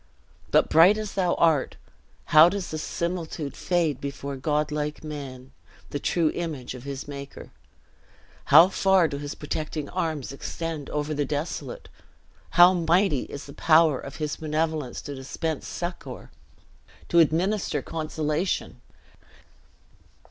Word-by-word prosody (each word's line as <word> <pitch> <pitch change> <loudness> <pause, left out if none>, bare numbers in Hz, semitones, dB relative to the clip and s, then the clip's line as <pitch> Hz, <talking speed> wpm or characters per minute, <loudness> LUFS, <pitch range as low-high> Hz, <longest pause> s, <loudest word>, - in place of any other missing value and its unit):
But - - +4
bright 175 +7 +6
as 215 -2 -5
thou 180 -3 +1
art, 160 -5 +2 0.6
how 155 +2 +9
does 195 -1 -4
the 155 - -3
similitude 165 -3 -4
fade 170 -6 0
before 140 0 -5
godlike 150 +1 -2
man, 135 -4 -8 0.4
the 145 - -2
true 165 +1 +1
image 155 -9 -5
of 125 0 -10
his 140 -1 -6
Maker. 140 -1 -9 0.9
How 175 - +8
far 190 -3 +3
do 140 -2 -5
his 145 0 -6
protecting 155 0 -4
arms 160 -7 -3
extend 155 +1 -5
over 150 +1 -2
the 145 0 0
desolate! 155 - -4 0.7
How 175 +1 +9
mighty 170 -3 +2
is 140 - -8
the 140 - -11
power 155 -4 +4
of 140 - -9
his 150 -1 -3
benevolence 155 -3 -2
to 145 - -6
dispense 140 +3 -4
succor, 175 0 -6 0.8
to 170 - +4
administer 165 -1 +1
consolation!" 155 +2 -2
155 Hz, 125 wpm, -25 LUFS, 145-170 Hz, 0.9 s, how